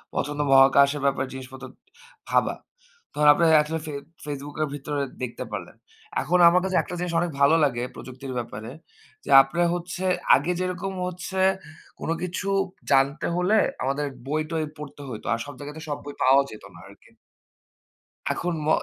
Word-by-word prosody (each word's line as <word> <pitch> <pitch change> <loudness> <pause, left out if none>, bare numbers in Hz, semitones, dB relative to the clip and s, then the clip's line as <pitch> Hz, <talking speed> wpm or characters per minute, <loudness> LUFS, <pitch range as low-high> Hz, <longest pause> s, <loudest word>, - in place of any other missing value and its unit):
পছন্দ 150 0 -2
মহাকাশের 140 +2 +6
ব্যাপারে 135 -1 +1
জিনিসপত্র 130 0 -9 0.6
ভাবা। - - +2 0.6
তহন 150 0 +2
আপনার 165 +2 +3
এটলিস্ট 155 +1 -4
ফে 150 - -5 0.3
Facebook 145 0 -6
এর 155 - +1
ভিতরে 145 0 -3 0.2
দেখতে 120 - -4
পারলেন। - - -6 0.5
এখন 180 +1 +1
আমার 180 +1 +3
কাছে 190 -1 0
একটা 180 - -7
জিনিস 175 -1 -3
অনেক 175 -1 -1
ভালো 140 +3 +6
লাগে 120 -4 +1
প্রযুক্তির 130 +1 -8
ব্যাপারে 115 -1 -6 0.5
যে - - -9
আপনার 170 +6 0
হচ্ছে 175 +1 -5 0.3
আগে 145 +7 0
যেরকম 185 +1 -3
হচ্ছে 180 +1 -5 0.6
কোনো 165 - -1
কিছু 180 +2 -3 0.4
জানতে 135 +2 +3
হলে 185 +5 +3 0.3
আমাদের 140 +3 -1 0.2
বই-টই 155 +2 -1
পড়তে 145 -1 -9
হইতো। 110 -3 -7
আর 115 - -2
সব 145 - -8
জাগাতে 150 +2 -8
সব 145 - -2
বই 145 - -6
পাওয়াও 135 +2 +6
যেত 110 - -11
না - - -13
আরকি। - - -19 1.2
এখন 175 0 -2
ম - - -3
145 Hz, 155 wpm, -25 LUFS, 135-170 Hz, 1.2 s, মহাকাশের